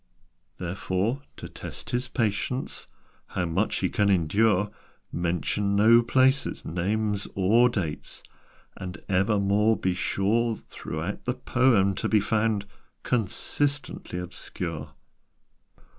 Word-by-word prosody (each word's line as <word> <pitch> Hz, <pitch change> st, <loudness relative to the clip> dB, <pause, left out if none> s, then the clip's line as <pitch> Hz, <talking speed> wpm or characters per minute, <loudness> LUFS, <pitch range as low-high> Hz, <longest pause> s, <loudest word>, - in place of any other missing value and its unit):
"Therefore, 95 Hz, +7 st, -1 dB, 0.2 s
to -, -, -7 dB
test -, -, -8 dB
his 125 Hz, +1 st, -1 dB
patience 115 Hz, +1 st, -2 dB, 0.4 s
How 90 Hz, -, -2 dB
much 90 Hz, +6 st, 0 dB
he 95 Hz, -, +1 dB
can 105 Hz, -1 st, +2 dB
endure 100 Hz, +3 st, +3 dB, 0.4 s
Mention 90 Hz, +4 st, 0 dB
no 115 Hz, +3 st, +7 dB
places, 130 Hz, +3 st, +2 dB
names, 100 Hz, +4 st, -1 dB
or 110 Hz, +6 st, +5 dB
dates, 90 Hz, -10 st, -4 dB, 0.5 s
And 90 Hz, -3 st, -7 dB
evermore 100 Hz, +2 st, +3 dB
be 95 Hz, 0 st, 0 dB
sure 105 Hz, +5 st, +1 dB
Throughout 85 Hz, -1 st, -6 dB
the 125 Hz, -, 0 dB
poem 120 Hz, -6 st, +3 dB
to -, -, -2 dB
be 110 Hz, -, +5 dB
found 105 Hz, 0 st, +1 dB, 0.4 s
Consistently 130 Hz, +1 st, -1 dB
obscure. 85 Hz, -3 st, -6 dB
100 Hz, 105 wpm, -27 LUFS, 90-115 Hz, 0.5 s, no